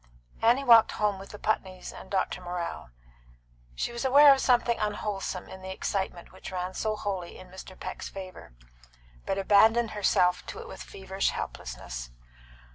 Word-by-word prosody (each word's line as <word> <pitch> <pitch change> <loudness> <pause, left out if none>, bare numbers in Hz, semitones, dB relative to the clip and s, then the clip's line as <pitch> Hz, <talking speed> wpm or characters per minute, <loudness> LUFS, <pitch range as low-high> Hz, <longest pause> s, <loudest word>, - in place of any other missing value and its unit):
Annie 240 +4 +4
walked 230 -4 +7
home 205 -2 0
with 195 - -10
the 210 - -9
Putneys 190 -4 -2
and - - -11
Dr. 190 -2 -1
Morrell. 175 - -5 0.9
She - - -2
was 235 +1 -4
aware 280 +2 +8
of 270 - -1
something 245 -2 +2
unwholesome 210 -3 -3
in 190 - -10
the 190 0 -6
excitement 190 -2 -3
which 185 - -10
ran 185 0 -3
so 215 +2 -1
wholly 195 -5 -4
in 185 - -13
Mr. 185 0 -11
Peck's - - -6
favour, 185 - -10 0.7
but 195 - 0
abandoned 220 +4 +4
herself 190 -3 +2
to - - -7
it - - -8
with 190 - -9
feverish 190 0 -2
helplessness. - - -6
195 Hz, 160 wpm, -28 LUFS, 185-220 Hz, 0.9 s, aware